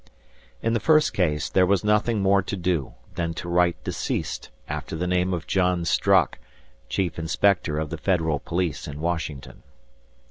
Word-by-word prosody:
In 115 - +1
the 115 - +2
first 155 +6 +4
case, 75 -5 0
there 95 -1 +3
was 100 +1 +2
nothing 105 0 +2
more 100 0 +4
to 100 - -4
do 85 -6 -1 0.2
than 85 -1 -2
to 85 - -6
write 85 0 +1
"deceased" - - -3 0.2
after - - -5
the 85 +3 -2
name 90 +1 +1
of 85 -4 -3
John 90 -2 +1
Strock, - - +3 0.5
chief 90 -4 -1
inspector 80 0 +1
of 75 -1 -3
the - - -4
federal 80 -6 +1
police 85 -2 -2
in 75 0 -7
Washington. 80 -4 -4
90 Hz, 165 wpm, -25 LUFS, 80-95 Hz, 0.5 s, first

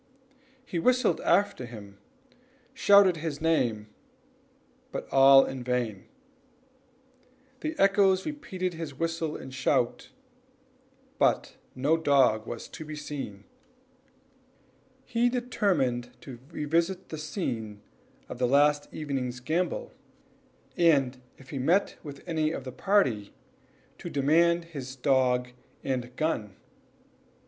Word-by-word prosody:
He 175 - -3
whistled 250 +6 +2
after 180 -8 +1
him, 115 -3 -9
and 100 0 -16 0.8
shouted 200 -7 +6
his 155 -2 -4
name, 125 -10 +1 1.0
but - - -5
all 135 0 +7
in 130 -2 -6
vain; 120 -6 -2 1.5
the 310 0 -4
echoes 195 -1 +4
repeated 190 -12 -4
his 160 -4 -6
whistle 165 -1 -2
and 130 - -10
shout, 130 -2 0 1.1
but - - +1 0.2
no 145 +5 +2
dog 135 -8 +3
was 120 - -6
to - - -8
be 155 0 -7
seen. 140 -9 -6 1.6
He 240 0 +1
determined 190 - 0
to 125 -4 -10
revisit 170 +4 -1
the 155 - -6
scene 115 - -4 0.4
of - - -8
the 125 - +2
last 145 +2 +3
evening's 130 -5 -4
gambol, 180 - -2 0.8
and 140 -7 +3 0.2
if 130 -1 -15
he 140 - -4
met 175 +10 +1
with 145 -3 -10
any 160 -3 0
of 155 - -5
the 130 - -7
party, 125 - +1 0.6
to - - -6
demand 170 +4 +3
his 135 -6 -8
dog 125 -2 +2 0.3
and 125 -2 -3
gun. 120 -11 -2
145 Hz, 115 wpm, -28 LUFS, 125-170 Hz, 1.6 s, all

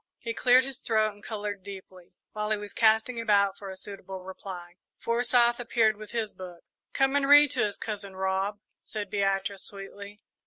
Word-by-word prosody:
He 230 -2 -4
cleared 250 +2 +5
his 270 -1 -5
throat 215 -2 +1
and 205 - -19
coloured 205 -2 -4
deeply. 185 -2 -11 0.2
While 210 0 -3
he 215 - +2
was 205 0 -8
casting 225 +2 +3
about 200 -3 +3
for 200 -1 -9
a 190 - -8
suitable 195 -2 -8
reply, 180 -2 -9 0.2
Forsyth 240 0 +2
appeared 230 -2 +2
with 215 0 -10
his 225 -3 -3
book. 180 -2 -10 0.3
"Come 270 +1 +2
and 280 -1 +2
read 290 -1 +8
to - - +2
us, 205 - -7
Cousin 205 -3 -6
Rob," 190 +2 -1 0.2
said 205 -2 -6
Beatrice, 195 -1 0
sweetly. 200 +1 -9
205 Hz, 180 wpm, -28 LUFS, 195-230 Hz, 0.3 s, read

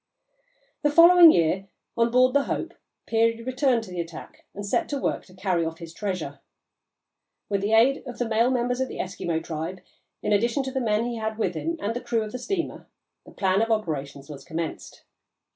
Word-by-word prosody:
The 295 - +3
following 335 +2 +9
year, 180 - +1 0.3
on 235 0 +2
board 255 +1 +4
the 285 0 +3
Hope, - - -3 0.3
Peary 230 0 +1
returned 255 -1 +1
to 185 - -11
the 175 -1 -2
attack 165 -1 -10
and 205 0 -5
set 330 +11 0
to 285 - -1
work - - -2
to 185 - -18
carry 185 -2 0
off 160 0 -4
his 165 -1 -10
treasure. 190 -1 -4 1.1
With 200 -1 0
the 205 +2 0
aid 250 +5 +4
of 245 - -7
the 245 - -1
male 225 +2 +2
members 250 0 0
of 260 - 0
the - - -8
Eskimo 170 -3 -3
tribe, 165 +3 -5 0.4
in - - +1
addition 235 +6 +1
to 265 - -4
the 265 0 -2
men 220 -1 +1
he 240 -1 -3
had 220 -1 -3
with 190 -5 0
him 330 - -3
and 225 -1 -2
the 245 - -3
crew 225 -2 -1
of 215 - -7
the 250 - -5
steamer, 345 +5 -4 0.4
the - - -12
plan 190 +1 +1
of 225 - 0
operations 145 -10 -2
was 145 -2 -9
commenced. 165 -1 -6
220 Hz, 205 wpm, -25 LUFS, 185-250 Hz, 1.1 s, following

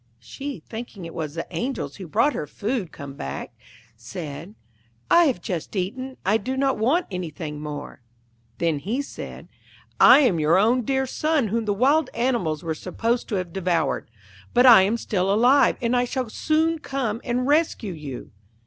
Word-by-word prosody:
She, 270 - -7
thinking 220 -5 -7
it 165 - -8
was 155 -2 -5
the 165 - -3
Angels 170 - -3
who 185 - -8
brought 230 - +2
her 150 - -4
food 215 - -3
come 140 -2 -8
back, 70 - -6 0.4
said, 155 - -8 0.6
'I 345 0 +7
have 260 - 0
just 175 +3 -4
eaten; 255 +8 -3
I 210 +4 +4
do 260 +5 -4
not 270 -2 +1
want 290 +11 +2
anything 160 -4 -5
more.' 145 -3 -7 0.6
Then 165 -4 0
he 230 - -2
said, - - -9 0.5
'I - - +9
am 215 - +3
your 155 +3 +4
own 230 +6 +3
dear 265 +1 +1
son 300 -2 0
whom 230 +2 -1
the 205 - +1
wild 275 +5 +3
animals 230 - 0
were 165 -1 -1
supposed 230 +9 -2
to 215 - -1
have 180 -3 -3
devoured; 170 - 0 0.5
but 245 +1 +6
I 235 -6 +10
am 205 +5 +1
still 195 -4 -1
alive, 245 +5 +4
and 235 +1 +2
I 245 0 +2
shall 250 -2 -3
soon 320 +4 +1
come 255 -6 -3
and 250 0 -1
rescue 290 - +1
you.' 145 -5 -8
215 Hz, 175 wpm, -24 LUFS, 165-260 Hz, 0.6 s, I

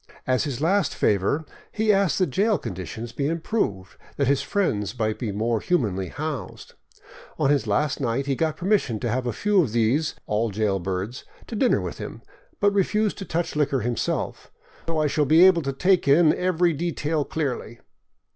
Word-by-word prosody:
As 130 +3 +1
his 140 -3 -4
last 185 +1 +1
favor, 105 +10 +1 0.3
he 215 -1 +2
asked 195 -4 +2
that 185 -7 +1
jail 205 - +2
conditions 110 +3 -6
be 140 +3 -2
improved, 160 - -2 0.2
that 140 - +2
his 140 +1 +2
friends 125 - -1
might 110 -2 -1
be 115 -5 -2
more 110 +3 0
humanly 100 - 0
housed. 145 - -6 0.6
On 135 - +2
his 140 -5 +1
last 130 +8 0
night 125 +2 0
he 140 -1 0
got 160 +2 -1
permission 180 - +1
to 120 - -1
have 125 +2 -1
a - - 0
few 205 - +2
of 125 -10 -2
these 120 +7 +1
— - - -47
all 110 +2 0
jailbirds 95 +2 -2
— - - -22
to 230 - -5
dinner 250 +4 +3
with - - -6
him, - - -7 0.4
but 205 0 +3
re 200 - +4
fused 210 +2 0
to 195 - -5
touch 170 -1 -2
liquor 140 -3 +1
himself, 120 -2 -3 0.2
" - - -26
so 165 -1 -1
I 155 - +2
shall 150 0 +1
be 160 +6 +6
able 185 -3 +5
to 135 -2 -2
take 180 +4 +2
in 155 +3 +5
every 180 -1 +1
de 170 +4 -2
tail 155 -1 -1
clearly." 130 -7 -4
140 Hz, 195 wpm, -24 LUFS, 115-175 Hz, 0.6 s, be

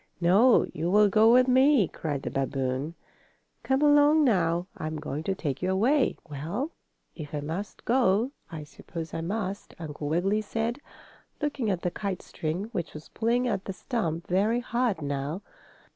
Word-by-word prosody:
"No! 200 +9 +5
You 165 +3 -2
will 205 +2 +5
go 220 +3 +5
with 250 +1 +6
me!" 260 - +5
cried 145 -4 -4
the - - -3
babboon. 135 +3 -2 0.7
"Come 270 +2 +1
along 295 +1 +6
now. 175 - +2
I'm 155 0 -4
going 150 -1 -4
to 195 - 0
take 140 -7 -3
you 185 - 0
away." 245 +9 +2
"Well, 160 - -4 0.4
if 150 -2 -7
I - - -1
must 165 +8 -6
go, 235 -1 +2 0.2
I 160 -2 -6
suppose 160 +2 -8
I 165 - -3
must," 200 +2 -4
Uncle 150 -2 -5
Wiggily 195 +7 +1
said, 225 +4 -2 0.6
looking 290 -7 -1
at 185 -3 -1
the 180 - 0
kite 195 -2 -4
string, 160 +4 -3
which 175 -10 -4
was 150 - -10
pulling 240 +3 0
at 200 -5 -2
the 195 - -4
stump 170 - -3
very 205 +6 +2
hard 235 -8 -1
now. 145 +6 -3
190 Hz, 165 wpm, -27 LUFS, 160-235 Hz, 0.7 s, with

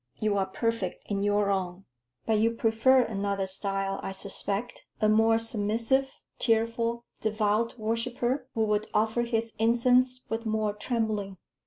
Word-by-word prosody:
You 215 -1 +1
are 190 -1 +1
perfect 230 -2 -2
in 200 -1 0
your 205 0 +2
own." 190 0 -3 0.4
"But 220 -1 +2
you 230 +1 +2
prefer 230 +4 +4
another 200 -3 -2
style, 195 0 -2
I 195 - -4
suspect. 200 +3 -4
A 215 - +3
more 225 +1 +4
submissive, 230 +4 +1 0.3
tearful, 230 +1 +1
devout 215 +2 0
worshipper, 240 +4 -1
who 220 -1 +2
would 210 0 0
offer 220 +2 +2
his 230 -1 -1
incense 250 +2 +3
with 225 +1 -3
more 215 -2 0
trembling." 210 -3 -2
220 Hz, 140 wpm, -28 LUFS, 205-230 Hz, 0.4 s, prefer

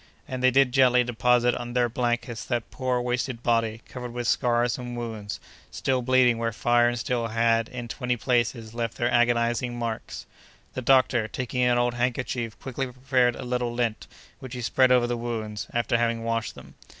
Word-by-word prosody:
And 130 -1 -5
they 130 - +5
did 135 0 +3
gently 125 -1 +5
deposit 125 0 +2
on 120 0 -5
their 120 -1 +2
blankets 120 -1 -2
that 120 -3 -3
poor, 130 -2 -1
wasted 125 0 -2
body, 115 -1 0
covered 125 -2 -7
with 120 -1 -3
scars 120 0 +1
and 120 -1 -6
wounds, 110 -4 -5 0.3
still 130 -1 -1
bleeding 125 -2 +3
where 115 0 -1
fire 120 +2 +3
and 120 - -3
steel 120 0 -1
had, 115 0 +1
in 120 -1 -6
twenty 125 +1 -2
places, 115 -2 0
left 115 -1 -3
their 120 +1 0
agonizing 120 0 +1
marks. 115 -2 -5 0.5
The 130 - -4
doctor, 130 -3 +3
taking 125 +3 -3
an 125 -1 +3
old 120 0 +1
handkerchief, 120 -2 -2
quickly 135 0 -4
prepared 125 -1 +1
a - - -7
little 125 -1 -1
lint, 120 -3 -2 0.3
which 130 -1 -8
he 125 - -5
spread 130 +2 +3
over 125 -1 +5
the 120 0 -2
wounds, 110 -3 -4
after 120 0 +1
having 115 -1 0
washed 115 0 -2
them. - - -13
120 Hz, 185 wpm, -26 LUFS, 115-125 Hz, 0.5 s, they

